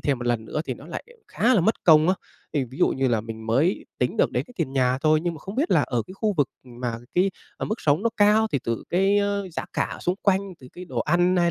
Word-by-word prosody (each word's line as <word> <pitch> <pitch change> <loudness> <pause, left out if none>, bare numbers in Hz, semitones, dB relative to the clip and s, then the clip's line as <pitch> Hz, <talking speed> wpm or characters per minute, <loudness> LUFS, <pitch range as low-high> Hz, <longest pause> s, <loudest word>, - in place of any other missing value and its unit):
thêm 140 -4 0
một 120 - -5
lần 120 -2 0
nữa 150 +7 -3
thì 130 - -3
nó 140 - -13
lại 170 - -6 0.2
khá 255 +2 +2
là 200 - +4
mất 220 +6 0
công 155 -1 +6
á. 185 - +4 0.4
Thì 145 -4 +1
ví 130 +3 -12
dụ - - +4
như 130 0 0
là 115 -3 +1
mình 110 0 -8
mới 145 - +1
tính - - 0
được - - +3
đến - - 0
cái 250 - -16
tiền 160 -7 -2
nhà 130 -1 +2
thôi, 155 +2 +3
nhưng 175 -1 -1
mà - - -9
không 195 - -7
biết 290 +8 0
là - - +4
ở 120 -3 -1
cái 185 - -10
khu 210 +1 0
vực 145 -3 +2 0.2
mà 120 -2 -5 0.2
cái, 185 +2 +3 0.3
ờ, - - -3
mức 215 - -3
sống 150 +5 +2
nó 230 - +3
cao 210 +1 +5
thì 140 - +2
từ 115 -1 -2
cái, 195 +3 +3
ơ, 200 -1 -1
giá - - -4
cả - - -1
xung 180 - 0
quanh, 195 -2 +3 0.2
từ 125 - -12
cái 180 - -9
đồ 130 -9 -5
ăn, 175 +6 +2
hay 175 -1 +3
160 Hz, 285 wpm, -24 LUFS, 130-195 Hz, 0.4 s, công